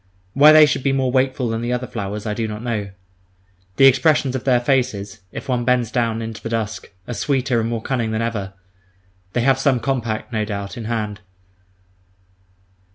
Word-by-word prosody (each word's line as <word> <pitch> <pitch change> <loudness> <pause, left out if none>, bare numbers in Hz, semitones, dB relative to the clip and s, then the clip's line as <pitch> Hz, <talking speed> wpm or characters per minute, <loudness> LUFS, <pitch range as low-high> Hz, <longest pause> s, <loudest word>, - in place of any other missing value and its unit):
Why 145 +3 +7
they 155 0 +8
should 145 - -1
be 135 +1 +1
more 130 -2 +1
wakeful 130 -1 +1
than 115 0 -2
the 120 +1 -2
other 125 0 -1
flowers, 105 -3 -5
I 105 - -1
do 115 +1 -2
not 105 +1 -6
know. 110 -4 -2 0.9
The 135 - +5
expressions 135 0 +4
of 130 - -4
their 125 -2 +4
faces, 120 -5 -1
if - - -8
one 125 -2 0
bends 125 -2 +1
down 115 -2 0
into 110 -1 -7
the 115 - -5
dusk, 110 -4 -3 0.2
are 120 - -4
sweeter 130 -2 0
and 115 - -2
more 115 -1 -3
cunning 120 -4 -1
than 110 0 -2
ever. 105 -5 -3 0.8
They 120 - +1
have 135 +1 +3
some 135 -2 +2
compact, 120 -3 -3
no 110 -1 0
doubt, 100 -1 -5
in 115 -3 -7
hand. 105 -2 -3
120 Hz, 190 wpm, -20 LUFS, 110-130 Hz, 0.9 s, they